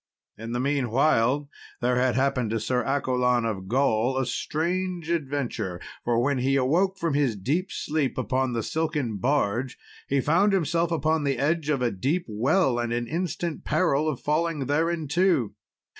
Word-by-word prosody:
In 115 +1 -7
the 120 - -1
meanwhile 135 0 +2 0.3
there 125 0 +1
had 125 0 +2
happened 130 -3 +1
to 115 +1 -1
Sir 125 +3 0
Accolon 125 -3 +1
of 95 -4 -3
Gaul 125 +1 +1
a 135 - +1
strange 170 +6 -2
adventure; 130 - -2 0.2
for 120 -1 +1
when 135 +2 +1
he 135 +2 +1
awoke 170 +9 +2
from 165 -5 -1
his 140 -6 +1
deep 150 - -1
sleep 150 -3 -2
upon 130 -1 0
the 115 -1 -1
silken 150 -9 -2
barge, 125 +1 0 0.3
he 140 - +1
found 180 +9 +3
himself 170 -2 +1
upon 160 -1 +1
the 140 -2 0
edge 155 +3 0
of 140 -4 +1
a 120 - +1
deep 145 - -1
well, 125 - +1
and 120 -1 -2
in 120 0 -1
instant 170 0 -3
peril 155 -1 +1
of 135 -5 -3
falling 155 +1 0
thereinto. 160 - +1
140 Hz, 160 wpm, -26 LUFS, 120-160 Hz, 0.3 s, found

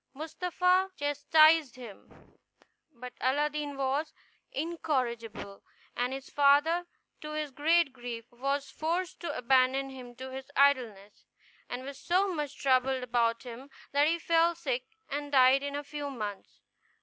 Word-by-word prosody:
Mustapha 360 +4 +1
chastised 290 0 +4
him; 235 -6 -14 0.5
but 250 -2 -10
Aladdin 290 +1 0
was 275 +3 -1 0.4
incorrigible, 245 -10 -3 0.3
and 245 +1 -1
his 270 0 -6
father, 295 +5 +3 0.3
to 305 0 -6
his 305 -2 -3
great 310 +1 +2
grief, 240 -2 -7
was 275 +3 -2
forced 345 +5 -2
to 345 - -4
abandon 265 +2 +2
him 250 -2 -10
to 260 +2 -8
his 265 +1 -8
idleness, 235 -8 +1 0.4
and 245 +1 -5
was 275 0 -8
so 370 +2 +1
much 295 -4 -4
troubled 260 -1 +2
about 235 -1 0
him 250 +2 -9 0.2
that 285 +1 +3
he 335 +2 +2
fell 335 0 +2
sick 260 -7 -3 0.2
and 290 0 -4
died 260 0 +6
in 285 0 -4
a 290 - -3
few 290 0 -5
months. 210 -7 -7
275 Hz, 135 wpm, -30 LUFS, 255-305 Hz, 0.5 s, died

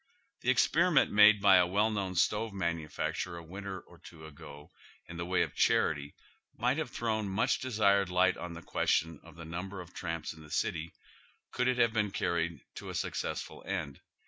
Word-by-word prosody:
The - - -1
expenment - - +3
made 105 -1 +6
by 95 -2 +7
a 90 -1 +4
well 105 +4 +2
known 95 -3 -3
stove 105 +5 +1
manufact 85 -5 -2
urer 85 -2 -7
a 85 - -9
winter 95 +3 -7
or - - -19
two 80 -1 -13
ago 75 -1 -12 0.4
in 85 - -9
the 85 0 -4
way 90 0 +2
of - - -5
charity 75 -2 +1 0.4
might 125 +5 +1
have 155 -5 -3
thrown 110 -4 -2
much 95 - +1
desired 100 -6 +2
light 90 +1 +3
on 90 -1 -7
the 85 0 -10
question 80 0 0
of 85 -2 -15
the 85 0 -9
number 90 +4 -6
of 90 0 -10
tramps 85 -3 -4
in 80 - -15
the 75 - -14
city, 80 +2 -2 0.6
could 125 - 0
it 130 -1 +1
have 115 -2 +3
been 105 -2 +1
carried 85 -3 -2 0.2
to - - -7
a - - -6
successful - - -4
end. 70 -1 -4
90 Hz, 195 wpm, -31 LUFS, 85-105 Hz, 0.6 s, by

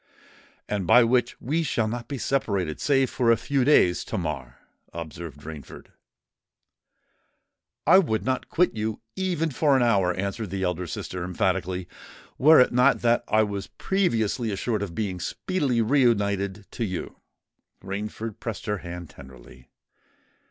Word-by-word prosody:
"And 100 -4 -2
by 125 - +7
which 120 +1 +1
we 155 +7 -1
shall 120 -7 0
not 120 +2 -5
be 140 - -4
separated, 100 - -1
save 135 -2 +2
for 120 -3 +1
a 115 - +5
few 135 +3 0
days, 125 -10 +4
Tamar," 75 - -4 0.4
observed 85 -2 -8
Rainford. 75 -3 -10 2.0
"I 185 +5 +7
would 110 - 0
not 130 0 -1
quit 175 -6 +2
you 110 0 -3 0.2
even 175 -4 -1
for 140 +2 +3
an 125 - +3
hour," 100 -6 +3
answered 100 +2 -3
the 95 +1 -3
elder 90 -1 -2
sister, 85 +3 -5
emphatically; 90 0 -1 0.5
"were 155 +4 +7
it 125 - +5
not 125 +3 +4
that 120 0 +3
I 110 0 +3
was 100 -1 -4
previously 115 - 0
assured 105 +2 -2
of 90 -5 -5
being 95 -3 -2
speedily 130 - -1
re 135 +6 +3
united 100 -4 +1
to 120 - -3
you." 95 -5 -4 0.7
Rainford 105 +3 -5
pressed 110 -6 -5
her 105 -1 -1
hand 85 -2 -8
tenderly. 65 -2 -15
110 Hz, 145 wpm, -25 LUFS, 90-125 Hz, 2.0 s, by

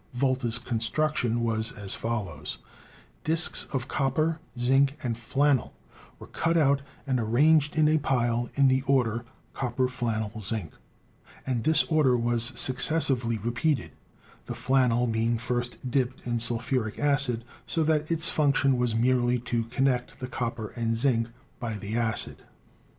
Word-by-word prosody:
Volta's 125 -2 0
construction 120 +1 -1
was 110 -1 +1
as 100 -2 -1
follows: 100 -10 -4 0.7
Disks 165 +2 +3
of 130 -2 -3
copper, 155 +5 0 0.2
zinc 135 +3 +3
and 120 -3 -1
flannel 135 +3 0 0.4
were - - -11
cut 165 +1 0
out 140 -3 +3 0.2
and 130 -3 0
arranged 145 +7 +3
in 155 -1 +4
a 155 +1 +3
pile 120 -4 0
in 140 -1 +4
the 130 0 +3
order, 120 -4 +1 0.3
copper, 125 0 -1
flannel, 110 -3 -3
zinc, 100 -4 -2 0.7
and 125 -4 -1
this 160 0 +4
order 150 -6 +2
was 120 0 0
successively 130 -3 +2
repeated, 120 +5 -1 0.6
the - - -5
flannel 125 -2 +2
being 115 0 0
first 120 +1 -3
dipped 130 -1 -1
in 120 -1 -1
sulphuric 115 -1 0
acid 140 -5 +1 0.2
so 165 - 0
that 155 -1 +1
its 165 0 +2
function 140 -3 +2
was 120 -2 0
merely 125 +1 +2
to 120 -1 -2
connect 125 +1 -1
the 130 - -4
copper 115 -3 -4
and 115 -1 -2
zinc 115 -2 +2 0.3
by 115 -3 -4
the 105 +1 -5
acid. 115 -2 0
125 Hz, 140 wpm, -27 LUFS, 115-140 Hz, 0.7 s, in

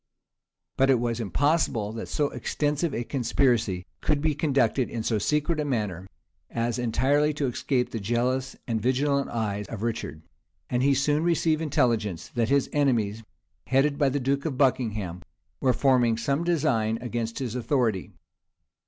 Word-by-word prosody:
But 135 0 +4
it 130 -3 +4
was 120 -1 -1
impossible 115 - +1
that 115 0 -6
so 145 -1 0
extensive 150 +2 -1
a 120 - -2
conspiracy 115 -7 +1 0.2
could 150 -2 +1
be 155 +1 +1
conducted 140 -4 +1
in 115 -2 -4
so 110 -1 0
secret 150 - 0
a - - +1
manner, 105 - -2 0.4
as 120 +1 -1
entirely 140 +6 +2
to 145 - -1
escape 125 0 -1
the 115 - -3
jealous 125 +5 -1
and 115 -3 -1
vigilant 140 +3 +1
eye 105 -3 -2
of 110 -1 -6
Richard; 110 -9 -3 0.5
and 125 - +1
he 140 +1 +3
soon 145 +3 +1
received 165 -2 +2
intelligence, 115 - 0
that 115 -2 -1
his 140 -1 +3
enemies, 115 -7 +1 0.5
headed 140 +2 +2
by 140 -2 +4
the 145 +2 -1
duke 140 +2 0
of 145 -5 -2
Buckingham, 110 -10 0 0.4
were 130 - +3
forming 125 -4 +3
some 140 +7 0
design 125 -10 +1
against 115 -1 -3
his 125 -5 -3
authority. 120 -5 0
125 Hz, 155 wpm, -26 LUFS, 115-140 Hz, 0.5 s, But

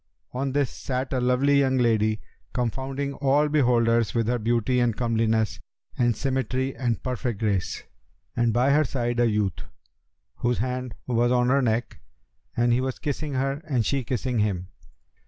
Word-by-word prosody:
On 135 +1 -2
this 140 -3 +1
sat 130 +1 -3
a 130 - +1
lovely 130 +3 +3
young 130 -1 +2
lady, 110 -3 +2 0.3
confounding 135 +3 -2
all 140 +2 +2
beholders 120 -6 +2
with 115 -1 +2
her 120 0 +1
beauty 120 +3 +1
and 120 -3 +1
comeliness 115 -2 +1 0.4
and 120 -2 +2
symmetry 130 0 -1
and 120 -4 -2
perfect 125 -4 -2
grace, 100 -5 -1 0.5
and 120 -1 +2
by 125 +5 +3
her 150 +2 +4
side 120 -3 -2
a 120 -1 +4
youth, 105 -4 -1 0.8
whose 120 0 0
hand 125 +1 -3
was 120 0 +1
on 125 0 +3
her 140 +1 +4
neck; 115 -1 -1 0.6
and 120 0 +3
he 125 - +2
was 130 -1 -2
kissing 145 -1 -3
her 135 +2 -1
and 130 -8 0
she 140 -2 0
kissing 125 0 -1
him. 95 -4 -1
125 Hz, 160 wpm, -25 LUFS, 115-135 Hz, 0.8 s, her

